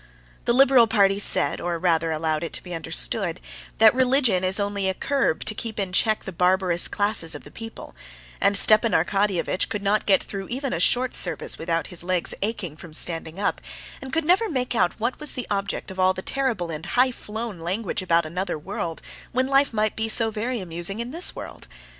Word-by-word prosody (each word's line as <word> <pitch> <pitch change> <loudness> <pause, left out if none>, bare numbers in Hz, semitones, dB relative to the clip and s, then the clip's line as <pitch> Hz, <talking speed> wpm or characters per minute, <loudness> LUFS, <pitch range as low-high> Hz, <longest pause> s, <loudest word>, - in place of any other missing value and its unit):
The 235 - +2
liberal 260 -2 +6
party 200 -3 +3
said, 185 -2 +2
or 175 -1 -2
rather 165 -2 +1
allowed 155 0 -1
it 165 - -5
to - - -2
be 180 - -8
understood, 60 - -1 0.4
that 220 -1 +6
religion 255 -7 +3
is 185 +2 +5
only 200 -1 -1
a 190 - -2
curb 275 - -1
to - - 0
keep 220 0 -5
in 190 -2 -3
check 215 +2 +2
the 190 - -6
barbarous 180 0 +2
classes 205 -6 0
of - - -9
the - - -13
people; 225 0 -10 0.5
and 200 0 +3
Stepan 215 +2 +5
Arkadyevitch 190 +1 0
could 205 -2 -4
not 205 +2 +1
get 195 -2 +4
through 195 -1 -7
even 265 +2 -4
a - - -2
short 250 +1 +2
service - - +1
without 165 0 -1
his 170 - -2
legs 180 -1 -1
aching 195 -7 -3
from 160 -2 -6
standing 165 +1 -3
up, 205 - -1 0.4
and 265 -1 -8
could 325 +2 0
never 380 +7 +3
make 255 -5 -2
out 185 -4 0
what 235 +3 -2
was 300 -1 0
the 250 - -4
object 195 -1 -3
of 190 - -9
all 185 0 +3
the 185 - -5
terrible 235 -11 -2
and 160 +3 -5
high 255 +1 +4
flown 220 -4 -6
language 185 +5 -2
about 170 -2 +2
another 180 +2 -3
world 165 0 -5 0.3
when 255 +1 +1
life 275 +1 +3
might 215 -1 -1
be 225 0 -2
so 225 0 +4
very 230 +3 -3
amusing 175 +3 -3
in 235 +1 -4
this 340 +5 +1
world. - - -9
200 Hz, 205 wpm, -24 LUFS, 175-235 Hz, 0.5 s, liberal